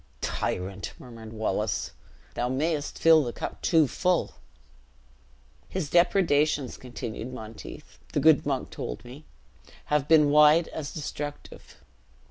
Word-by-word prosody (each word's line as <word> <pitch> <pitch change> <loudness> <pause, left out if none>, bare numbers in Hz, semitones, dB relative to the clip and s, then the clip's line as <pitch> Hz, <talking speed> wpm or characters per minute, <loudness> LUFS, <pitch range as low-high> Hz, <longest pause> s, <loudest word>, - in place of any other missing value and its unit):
"Tyrant!" 95 +2 -3
murmured 115 -3 -11
Wallace, 110 -1 -2 0.4
"thou 120 +1 -1
mayest 145 +3 -1
fill 160 -2 +6
the 120 - -3
cup - - -6
too 160 -4 +4
full." 180 +5 0 1.4
"His 180 -6 -4
depredations," 155 -6 +2
continued 120 -1 -7
Monteith, 110 - -10
"the - - 0
good - - +5
monk - - -2
told - - -6
me, 135 +6 -11 0.7
have 150 -1 +2
been 150 -2 +5
wide 150 +2 +6
as 150 -2 -6
destructive. 145 -1 -7
145 Hz, 115 wpm, -27 LUFS, 120-155 Hz, 1.4 s, fill